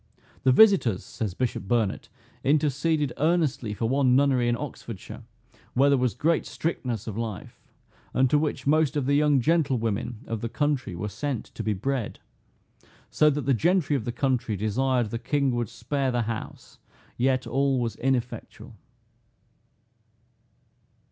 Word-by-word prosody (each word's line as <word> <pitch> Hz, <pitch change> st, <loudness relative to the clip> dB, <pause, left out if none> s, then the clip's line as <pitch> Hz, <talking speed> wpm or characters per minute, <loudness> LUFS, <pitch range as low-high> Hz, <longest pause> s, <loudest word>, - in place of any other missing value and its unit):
"The 130 Hz, -, +4 dB
visitors," 170 Hz, -, +5 dB
says 105 Hz, -6 st, -5 dB
Bishop 120 Hz, -5 st, -2 dB
Burnet, 110 Hz, -3 st, 0 dB, 0.3 s
"interceded 150 Hz, 0 st, +1 dB
earnestly 155 Hz, -8 st, +1 dB
for 115 Hz, -, -1 dB
one 130 Hz, 0 st, +3 dB
nunnery 130 Hz, -3 st, +3 dB
in 120 Hz, 0 st, +1 dB
Oxfordshire, 120 Hz, -7 st, -8 dB, 0.5 s
where 135 Hz, +3 st, +5 dB
there 140 Hz, -, +4 dB
was 125 Hz, -5 st, 0 dB
great 165 Hz, +1 st, +1 dB
strictness 125 Hz, -, -3 dB
of 110 Hz, -1 st, -5 dB
life, 110 Hz, -4 st, -6 dB, 0.5 s
and 130 Hz, +1 st, +3 dB
to 150 Hz, -, +4 dB
which 145 Hz, -3 st, -2 dB
most 150 Hz, 0 st, +2 dB
of 140 Hz, -, 0 dB
the 140 Hz, -, +1 dB
young 145 Hz, -1 st, +4 dB
gentlewomen 120 Hz, -7 st, 0 dB
of 115 Hz, -2 st, -4 dB
the 115 Hz, -, -3 dB
country 140 Hz, -9 st, -1 dB
were 95 Hz, +5 st, -4 dB
sent 130 Hz, +2 st, -3 dB
to -, -, -5 dB
be 110 Hz, 0 st, 0 dB
bred; 125 Hz, +3 st, -3 dB, 0.9 s
so 150 Hz, -, +4 dB
that 145 Hz, -3 st, -2 dB
the 135 Hz, -, +3 dB
gentry 160 Hz, -, +2 dB
of 120 Hz, -6 st, -2 dB
the 120 Hz, -, -2 dB
country 125 Hz, -4 st, 0 dB
desired 120 Hz, +3 st, 0 dB
the 115 Hz, -, -3 dB
king 140 Hz, +1 st, 0 dB
would 120 Hz, -3 st, -2 dB
spare 135 Hz, +2 st, -2 dB
the 120 Hz, -2 st, 0 dB
house: 110 Hz, 0 st, -7 dB, 0.4 s
yet 130 Hz, +1 st, +1 dB
all 135 Hz, 0 st, +1 dB
was 115 Hz, -3 st, -2 dB
ineffectual." 130 Hz, -2 st, -3 dB
130 Hz, 150 wpm, -26 LUFS, 115-145 Hz, 0.9 s, visitors